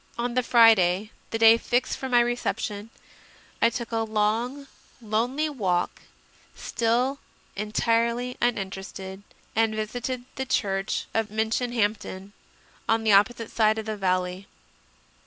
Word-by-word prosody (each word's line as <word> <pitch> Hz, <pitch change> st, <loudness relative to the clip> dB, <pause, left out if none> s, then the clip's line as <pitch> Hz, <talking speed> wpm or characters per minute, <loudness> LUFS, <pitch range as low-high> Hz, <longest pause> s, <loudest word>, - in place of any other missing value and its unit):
On 240 Hz, +1 st, -2 dB
the 255 Hz, -, +2 dB
Friday, 220 Hz, -4 st, +4 dB, 0.2 s
the 225 Hz, -, -2 dB
day 225 Hz, 0 st, +7 dB
fixed 245 Hz, +2 st, 0 dB
for 265 Hz, -, -5 dB
my 245 Hz, -1 st, +5 dB
reception, 230 Hz, -3 st, -2 dB, 0.7 s
I 230 Hz, -, +6 dB
took 235 Hz, 0 st, -5 dB
a 225 Hz, -, -1 dB
long, 225 Hz, +5 st, -1 dB, 0.3 s
lonely 240 Hz, +7 st, 0 dB
walk, 190 Hz, -12 st, -1 dB, 0.5 s
still 245 Hz, +4 st, 0 dB, 0.4 s
entirely 230 Hz, +4 st, 0 dB
uninterested, 195 Hz, -4 st, -3 dB, 0.3 s
and 220 Hz, -1 st, +2 dB
visited 245 Hz, +3 st, -4 dB
the 265 Hz, -, -2 dB
church 195 Hz, -3 st, -1 dB
of 225 Hz, -1 st, 0 dB
Minchinhampton, 220 Hz, -3 st, -1 dB, 0.6 s
on 225 Hz, 0 st, +2 dB
the 220 Hz, -, +3 dB
opposite 225 Hz, +3 st, +3 dB
side 220 Hz, -1 st, +3 dB
of 220 Hz, -, -4 dB
the 215 Hz, -1 st, -3 dB
valley. 185 Hz, -1 st, -1 dB
225 Hz, 120 wpm, -26 LUFS, 205-240 Hz, 0.7 s, day